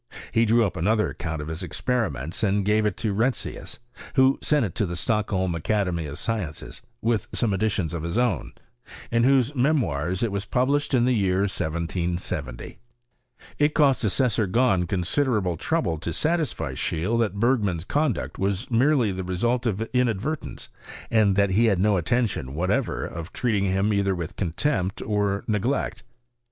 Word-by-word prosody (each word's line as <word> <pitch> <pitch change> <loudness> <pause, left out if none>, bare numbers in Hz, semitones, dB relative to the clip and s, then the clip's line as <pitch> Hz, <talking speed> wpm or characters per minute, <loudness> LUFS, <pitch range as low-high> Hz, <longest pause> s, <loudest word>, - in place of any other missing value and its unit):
He 115 +1 +3
drew 115 +1 +4
up 95 -2 -3
another 105 +5 +1
account 80 -3 -4
of - - -8
his 80 +2 -4
experiments 90 - -2
and 100 -2 +1
gave 105 +1 +3
it 105 - -3
to 110 -3 -1
Retzius, 120 +6 -2 0.4
who 130 0 +4
sent 150 -5 +2
it 90 - -5
to 105 - 0
the 85 - -4
Stockholm 95 -2 0
Academy 85 -1 -1
of 70 - -6
Sciences 100 -10 -3 0.2
(with 115 -3 +1
some 110 -4 +1
additions 95 -4 0
of 85 - -3
his 85 +6 -3
own), 120 - 0 0.6
in 115 0 +3
whose 135 0 +3
Memoirs 115 - 0
it 115 - 0
was 100 0 -3
published 140 +5 +1
in 120 -1 +3
the 125 - +3
year 95 -3 +2
1770.* 85 -6 -3 0.8
It 150 +1 +2
cost 140 -4 +3
Assessor 110 +1 +2
Grahn 95 -4 +2
considerable 95 +1 0
trouble 80 0 -1
to 85 - -3
satisfy 160 - 0
Seheele 95 +9 -1
that 105 -3 0
Bergman's 105 -8 +1
conduct 145 -1 -1
was 100 +5 -1
merely 125 -2 +3
the 95 0 -4
result 120 +7 0
of 110 +1 -1
in 125 -1 +3
advertence, 135 +9 -4 0.4
and 105 -4 +4
that 100 -1 +3
he 110 +5 +4
had 105 -4 +3
no 105 +1 +3
intention 90 - -1
whatever 90 +4 0
of 85 +3 -7
treating 105 -5 0
him 95 +2 +1
either 100 -1 +1
with 85 -3 -5
contempt 95 - -1
or 100 -1 0
neglect. 110 -1 -1
105 Hz, 165 wpm, -25 LUFS, 90-120 Hz, 0.8 s, drew